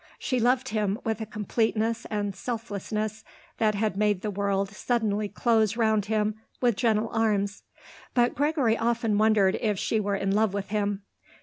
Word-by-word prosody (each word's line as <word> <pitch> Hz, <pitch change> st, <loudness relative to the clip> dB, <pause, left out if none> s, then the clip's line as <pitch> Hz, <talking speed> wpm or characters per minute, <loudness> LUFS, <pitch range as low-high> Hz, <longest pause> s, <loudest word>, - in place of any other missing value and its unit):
She 255 Hz, -, -1 dB
loved 250 Hz, +2 st, +2 dB
him 210 Hz, -2 st, 0 dB
with 225 Hz, -1 st, -2 dB
a 220 Hz, -, -4 dB
completeness 220 Hz, +2 st, -1 dB
and 205 Hz, -2 st, -2 dB
selflessness 215 Hz, -1 st, -4 dB, 0.4 s
that 215 Hz, -2 st, +2 dB
had 210 Hz, -1 st, 0 dB
made 205 Hz, -2 st, +1 dB
the 210 Hz, -, -1 dB
world 200 Hz, 0 st, 0 dB
suddenly 210 Hz, -2 st, -1 dB
close 225 Hz, -2 st, +2 dB
round 220 Hz, -3 st, +2 dB
him 215 Hz, 0 st, -1 dB, 0.2 s
with 240 Hz, -3 st, +2 dB
gentle 225 Hz, -1 st, +1 dB
arms; 205 Hz, -3 st, 0 dB, 0.5 s
but 240 Hz, -1 st, +3 dB
Gregory 285 Hz, -5 st, +2 dB
often 230 Hz, -2 st, 0 dB
wondered 215 Hz, -3 st, +3 dB
if 210 Hz, -3 st, 0 dB
she 220 Hz, -, 0 dB
were 205 Hz, -1 st, 0 dB
in 195 Hz, 0 st, -1 dB
love 210 Hz, 0 st, +2 dB
with 200 Hz, -1 st, -3 dB
him. 205 Hz, -1 st, -1 dB
215 Hz, 165 wpm, -27 LUFS, 205-225 Hz, 0.5 s, but